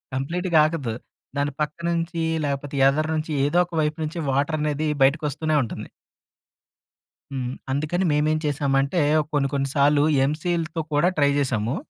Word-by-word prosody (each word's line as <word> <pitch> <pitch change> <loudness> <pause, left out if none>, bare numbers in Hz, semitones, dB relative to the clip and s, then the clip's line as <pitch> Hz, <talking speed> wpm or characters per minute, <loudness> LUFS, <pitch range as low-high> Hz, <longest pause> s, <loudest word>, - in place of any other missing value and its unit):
కంప్లీట్‌గా 170 +5 +1
ఆగదు. 150 -8 -2 0.4
దాని 145 0 0
పక్క 150 0 -2
నుంచి, 170 0 -2 0.2
లేపోతే 140 0 -3
ఎదర 155 +3 0
నుంచి 155 +1 -3
ఏదో 145 +4 +1
ఒక 175 - -21
వైపు 150 0 -1
నుంచి 160 +3 -5
వాటర్ 145 +4 0
అనేది 150 0 -1 0.2
బయటకి 145 +4 +3
వస్తూనే 155 +2 -1
ఉంటుంది. 115 - -7 1.4
హ్మ్, 130 -2 -3 0.2
అందుకని 155 +7 0
మేమేం 155 +1 +2
చేశామంటే 140 +1 +1 0.3
కొన్ని 140 -2 +1
కొన్ని 135 -1 0
సార్లు 145 +1 +4 0.2
ఎమ్‌సీల్‌తో 165 +2 -2
కూడా 150 +4 +3
ట్రై 145 -1 +4
చేశాము... 120 -4 0
150 Hz, 140 wpm, -23 LUFS, 140-160 Hz, 1.4 s, సార్లు